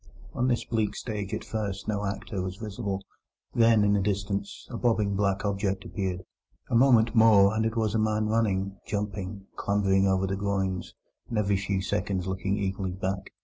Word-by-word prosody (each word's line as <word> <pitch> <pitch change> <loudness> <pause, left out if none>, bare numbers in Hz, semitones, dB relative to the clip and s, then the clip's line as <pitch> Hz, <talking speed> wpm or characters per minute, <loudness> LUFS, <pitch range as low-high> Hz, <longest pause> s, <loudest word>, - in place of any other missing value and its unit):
On 125 - 0
this 120 -2 +1
bleak 110 -3 -1
stage 105 -4 -4
at - - -3
first 100 -3 -4
no 105 -1 -1
actor 100 0 -4
was 90 0 -4
visible. 100 -2 -4 0.5
Then, 115 -3 +5
in 100 0 +3
the 100 - +3
distance, 100 0 -2
a - - -5
bobbing 110 -5 +1
black 100 0 0
object 100 -1 -1
appeared; 95 -3 -3 0.5
a - - +2
moment 120 -2 +5
more, 110 -3 +6
and 110 0 +2
it 115 +1 -4
was 110 -2 +1
a 110 - +2
man 110 0 +1
running, 100 -3 0
jumping, 100 -1 -4
clambering 100 -1 +2
over 95 0 +2
the 95 0 -1
groynes, 95 -2 -2 0.3
and 115 - -2
every 100 -1 +2
few 100 -1 -1
seconds 100 -2 -1
looking 95 +1 -1
eagerly 95 -2 -2
back. 95 +1 -3
100 Hz, 180 wpm, -27 LUFS, 95-110 Hz, 0.5 s, more